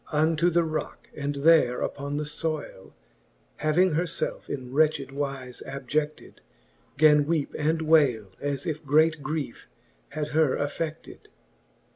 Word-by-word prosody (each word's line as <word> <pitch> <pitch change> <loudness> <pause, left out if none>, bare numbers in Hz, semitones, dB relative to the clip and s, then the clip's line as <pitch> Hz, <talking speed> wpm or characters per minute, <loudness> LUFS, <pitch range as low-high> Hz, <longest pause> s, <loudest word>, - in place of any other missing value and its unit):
Unto 160 +2 +2
the 170 0 +2
rocke, 155 -1 -5
and 145 0 -3
there 140 -4 +4
upon 140 +1 -3
the 150 - -1
fbyle 150 - -4 0.6
Having 175 +4 +2
her 165 +4 +1
felfe 165 - -4
in 130 -2 -5
wretched 150 -2 +2
wize 135 -2 -5
abjecied, 150 +3 -4 0.6
Gan 150 -1 +6
weepe 160 -3 -1
and 160 +2 0
wayle, 135 - +3
as 140 -1 -3
if 155 -2 -3
great 155 +2 +3
griefe 145 - -4 0.5
had 150 0 -3
her 155 -3 +2
afFeded. 155 +2 -5
150 Hz, 130 wpm, -26 LUFS, 140-155 Hz, 0.6 s, Gan